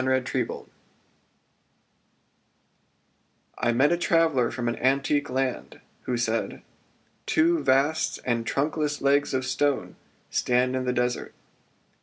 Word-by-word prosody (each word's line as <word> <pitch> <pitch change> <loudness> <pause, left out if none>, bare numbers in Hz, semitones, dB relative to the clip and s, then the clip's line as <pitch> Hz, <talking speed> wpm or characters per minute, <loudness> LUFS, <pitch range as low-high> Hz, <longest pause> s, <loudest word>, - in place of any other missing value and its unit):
Text[edit] 130 -1 -1 2.9
I 120 - +2
met 135 +6 +3
a 175 - +2
traveller 165 -8 +2
from 120 -2 -4
an 120 - 0
antique 140 +2 +1
land 130 0 -2 0.3
Who 125 -1 0
said: 115 -1 -2 0.6
Two 165 +1 +3
vast 140 +3 +1
and 120 -2 0
trunkless 145 +4 -1
legs 140 +1 +3
of 130 0 -1
stone 135 +2 -1 0.3
Stand 125 +1 +1
in 130 0 -2
the 125 - +1
desart. 125 0 -1
130 Hz, 110 wpm, -26 LUFS, 125-145 Hz, 2.9 s, met